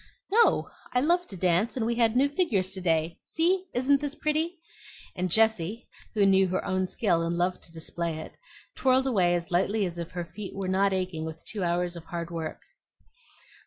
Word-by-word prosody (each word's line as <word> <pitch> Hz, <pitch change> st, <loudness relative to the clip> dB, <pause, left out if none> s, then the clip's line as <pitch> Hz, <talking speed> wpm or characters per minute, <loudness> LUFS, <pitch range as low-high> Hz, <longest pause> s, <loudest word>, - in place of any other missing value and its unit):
"No; 460 Hz, +3 st, +4 dB, 0.2 s
I 250 Hz, -, +2 dB
love 345 Hz, +6 st, +2 dB
to 195 Hz, -, -7 dB
dance, 185 Hz, +7 st, +1 dB
and 230 Hz, -, 0 dB
we 235 Hz, -, +1 dB
had 230 Hz, -1 st, +2 dB
new 270 Hz, +3 st, +4 dB
figures 240 Hz, -, 0 dB
to 190 Hz, -1 st, -5 dB
day. 165 Hz, -1 st, 0 dB
See! 360 Hz, +3 st, +1 dB
isn't 270 Hz, +3 st, +3 dB
this 290 Hz, 0 st, -3 dB
pretty?" 315 Hz, +4 st, -1 dB, 0.6 s
and 180 Hz, 0 st, -1 dB
Jessie, 220 Hz, +1 st, +2 dB, 0.3 s
who 205 Hz, -2 st, +4 dB
knew 190 Hz, -1 st, +5 dB
her 185 Hz, +1 st, -2 dB
own 185 Hz, -1 st, 0 dB
skill 185 Hz, -6 st, +1 dB
and 170 Hz, +1 st, -1 dB
loved 180 Hz, +1 st, 0 dB
to -, -, -10 dB
display 165 Hz, 0 st, -2 dB
it, 160 Hz, -, -8 dB, 0.4 s
twirled 260 Hz, 0 st, +3 dB
away 185 Hz, -9 st, +3 dB
as 170 Hz, 0 st, -4 dB
lightly 195 Hz, +4 st, +2 dB
as 175 Hz, -1 st, -5 dB
if 170 Hz, 0 st, -4 dB
her 175 Hz, -1 st, -5 dB
feet 190 Hz, +5 st, -8 dB
were 195 Hz, -1 st, -3 dB
not 195 Hz, +1 st, +2 dB
aching 185 Hz, -4 st, -2 dB
with 160 Hz, 0 st, -7 dB
two 210 Hz, -, -5 dB
hours 175 Hz, 0 st, 0 dB
of 165 Hz, -1 st, -9 dB
hard 170 Hz, 0 st, -5 dB
work. 165 Hz, -2 st, -5 dB
190 Hz, 200 wpm, -27 LUFS, 175-245 Hz, 0.6 s, knew